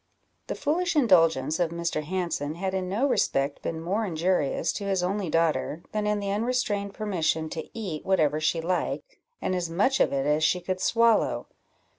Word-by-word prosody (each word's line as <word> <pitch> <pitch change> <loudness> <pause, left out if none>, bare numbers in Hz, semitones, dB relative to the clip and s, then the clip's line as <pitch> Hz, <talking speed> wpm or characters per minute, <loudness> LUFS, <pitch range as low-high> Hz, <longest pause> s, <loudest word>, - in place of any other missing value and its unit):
The - - -3
foolish 345 +4 0
indulgence 165 - +4
of 175 -2 +2
Mr. 170 -2 -2
Hanson 165 -3 -2
had 190 +2 -3
in 185 -1 -2
no 225 +9 +1
respect 140 - 0
been 160 - -3
more 190 +7 -1
injurious 170 -4 0
to 205 - -5
his 190 -2 0
only 190 0 -1
daughter, 165 0 0
than 210 -1 -1
in 210 0 +1
the 200 -1 -2
unrestrained 210 -2 -1
permission 165 -6 -1
to 160 - -5
eat 185 -9 -4
whatever 155 -6 +2
she 160 +1 +1
liked, 185 - -2 0.3
and - - 0
as 180 -2 -1
much 210 +11 +2
of - - +3
it 135 0 0
as 150 +1 +2
she 180 +3 +3
could 185 +1 -3
swallow. 230 -1 +2
180 Hz, 180 wpm, -27 LUFS, 160-205 Hz, 0.3 s, indulgence